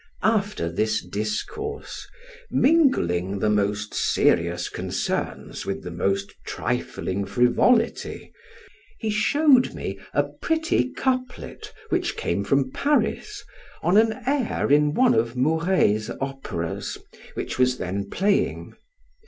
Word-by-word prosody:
After 205 - +1
this 110 +6 0
discourse 265 - -4 0.4
(mingling 100 - +2
the 105 +2 +1
most 105 +1 0
serious 85 +1 +2
concerns - - -3
with - - -4
the - - -6
most 100 0 -1
trifling 95 +2 -3
frivolity) 130 - +1 0.6
he 220 -2 -2
showed 260 +5 +4
me - - -5
a - - +2
pretty 320 -4 0
couplet, 255 -1 -3 0.2
which - - 0
came 90 +4 -1
from 135 +4 +1
Paris, 300 - 0 0.4
on 180 - +3
an 220 +1 +5
air 270 - 0
in 150 +1 +4
one 255 -1 +5
of 115 +2 +1
Mouret's 150 - +2
operas, 135 -12 -4 0.4
which - - -4
was 125 0 +3
then 100 +1 -3
playing. 200 - 0
135 Hz, 110 wpm, -24 LUFS, -, 0.6 s, an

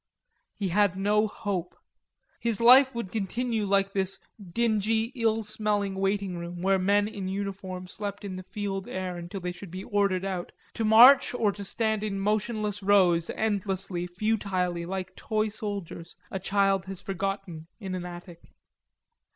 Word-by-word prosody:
He 195 -2 -2
had 200 0 +2
no 210 +2 +2
hope. 190 -4 -4 0.6
His 230 -3 -1
life 255 +2 +7
would 230 -6 -4
continue 220 +1 -1
like 195 0 +2
this 195 0 -1 0.3
dingy, 225 +1 +1
ill 225 -3 +1
smelling 210 -2 -1
waiting 195 -1 -1
room 175 +1 -6
where 195 0 +3
men 205 +2 +3
in 200 -3 -5
uniform 190 -1 -4
slept 200 +2 -6
in 190 -2 -5
the 185 - -6
fetid 195 0 -4
air 185 -1 -3
until 175 +3 -6
they 180 0 -3
should 180 +1 -10
be 185 +3 -6
ordered 200 -2 +1
out 185 -3 -3 0.2
to 225 - -2
march 245 +5 +7
or 215 -4 +2
to 200 0 -8
stand 220 +1 -1
in 200 -2 -2
motionless 210 0 -1
rows, 185 -4 +4
endlessly, 195 -4 -1
futilely, 180 -3 -1
like 190 0 -4
toy 215 -1 -1
soldiers 200 -5 -6 0.2
a 190 - -3
child 195 0 +1
has 190 -1 -7
forgotten 195 -4 -4
in 190 -4 -5
an 180 -1 -3
attic. 175 -1 -10
195 Hz, 155 wpm, -27 LUFS, 185-215 Hz, 0.6 s, life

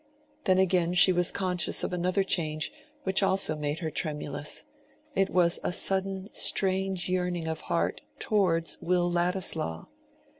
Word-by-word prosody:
Then 185 -2 +3
again 180 -2 +1
she 185 +1 +6
was 175 -1 +1
conscious 180 -3 0
of - - -3
another 180 +2 0
change 155 -4 -1 0.3
which 190 +1 +2
also 190 -5 +3
made 150 0 -3
her 155 - -3
tremulous; 150 -2 -2 0.5
it 195 0 +1
was 175 -1 +3
a - - -1
sudden 190 +1 +1
strange 190 -1 +2
yearning 180 -2 -2
of 160 -1 -4
heart - - -1 0.2
towards 180 - 0
Will 175 0 0
Ladislaw. 175 - 0
180 Hz, 140 wpm, -27 LUFS, 165-190 Hz, 0.5 s, she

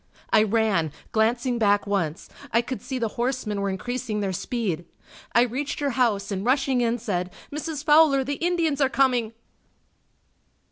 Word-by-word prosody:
I 215 - +7
ran, 215 -7 +1 0.2
glancing 235 +2 +1
back 205 -2 +3
once, 180 -6 -2 0.2
I 230 +1 +3
could 255 +1 -5
see 265 - -4
the 230 -3 -1
horsemen 240 -5 -1
were 200 - 0
increasing 230 +3 -3
their 195 -2 -1
speed. 185 -5 -2 0.5
I 235 - +7
reached 260 +4 -3
her 285 -1 0
house 220 -6 +1
and 195 -1 -2
rushing 265 +1 +2
in 235 0 +1
said, 180 -5 -3 0.2
"Mrs. 300 0 -4
Fowler, 295 -3 +5
the 285 +4 -4
Indians 335 -5 +1
are 270 - +4
coming!" 250 -5 +2
235 Hz, 155 wpm, -25 LUFS, 205-270 Hz, 0.5 s, I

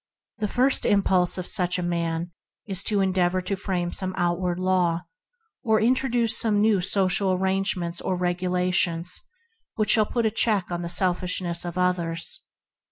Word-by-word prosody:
The 215 - 0
first 255 +6 +2
impulse 190 -3 +2
of 185 - -4
such 180 0 +2
a 180 - -3
man 170 0 -2 0.3
is 195 -2 -3
to 205 -3 +2
endeavor 185 -1 +1
to 195 +2 -2
frame 180 -3 -3
some 185 -1 -4
outward 175 0 0
law, 180 -2 +1 0.6
or 220 -1 +2
introduce 240 0 +2
some 215 -3 +2
new 210 -2 +3
social 190 0 +1
arrangements 185 -2 -1
or 185 - -1
regula 180 0 -1
tions, 175 -1 0 0.6
that 215 -2 0
shall 215 -2 +4
put 235 -2 -1
a 220 - +2
check 210 -5 0
on 175 0 -3
the 170 - -4
sel 180 +1 +3
fishness 180 -1 -2
of 175 0 -5
others. 175 -2 -1
185 Hz, 165 wpm, -24 LUFS, 175-200 Hz, 0.6 s, shall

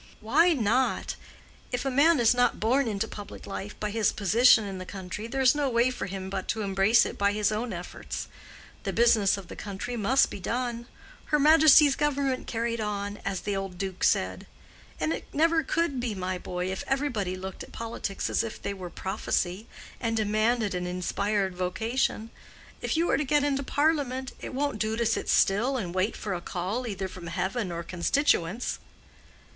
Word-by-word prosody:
"Why 335 +11 +4
not? 250 0 +1 0.6
if 245 +1 -2
a 270 - 0
man 290 +3 +5
is 235 -1 +5
not 245 0 +2
born 250 +4 +2
into 210 0 -1
public 205 -2 -9
life 200 +1 -6
by 210 0 -2
his 220 -1 +2
position 220 +3 +5
in 195 -2 -5
the - - -5
country, 195 +3 -6
there's 265 +1 +3
no 290 -2 0
way 240 +1 +3
for 250 - -4
him 190 0 -5
but 190 -1 -4
to 220 - -1
embrace 195 +3 +4
it - - -6
by 200 0 +3
his 210 0 +1
own 225 +2 -2
efforts. 175 -1 -6 0.5
The - - -3
business 225 -4 +4
of 195 -3 -9
the - - -9
country 205 +4 -5
must 235 +4 +3
be - - -6
done—her 240 - -3
Majesty's 300 -1 +7
Government 280 -3 0
carried 230 0 -2
on, 205 -1 -3
as 195 -2 -2
the 205 - -2
old 195 -2 -4
Duke 190 -1 -4
said. 95 0 +1 0.5
And 155 +1 0
it - - -6
never 325 +2 +3
could 315 -2 -1
be, 240 -4 -2
my 185 -1 -3
boy, 180 +1 -3
if 190 - -4
everybody 245 -10 -1
looked 190 +1 -7
at - - -9
politics 225 -4 -4
as - - +1
if 230 - -6
they 200 - -3
were 185 -3 -7
prophecy, 190 +1 -2 0.3
and 225 -2 -1
demanded 215 0 +1
an 180 0 -2
inspired 190 +2 -1
vocation. 220 +5 -1 0.5
If - - -1
you 335 +1 +2
are - - +3
to 300 - 0
get 295 +1 +2
into 280 -1 +1
Parliament, 280 -3 0
it - - -6
won't 285 -5 -1
do 215 +1 0
to 235 - +1
sit 225 - 0
still 235 +8 +3
and 180 -7 -4
wait 185 +4 0
for 205 - -3
a 175 - -4
call 195 +9 -3
either 195 -3 -3
from 180 -2 -9
heaven 185 +4 -2
or 170 0 -4
constituents." 185 - 0
215 Hz, 185 wpm, -27 LUFS, 190-255 Hz, 0.6 s, Majesty's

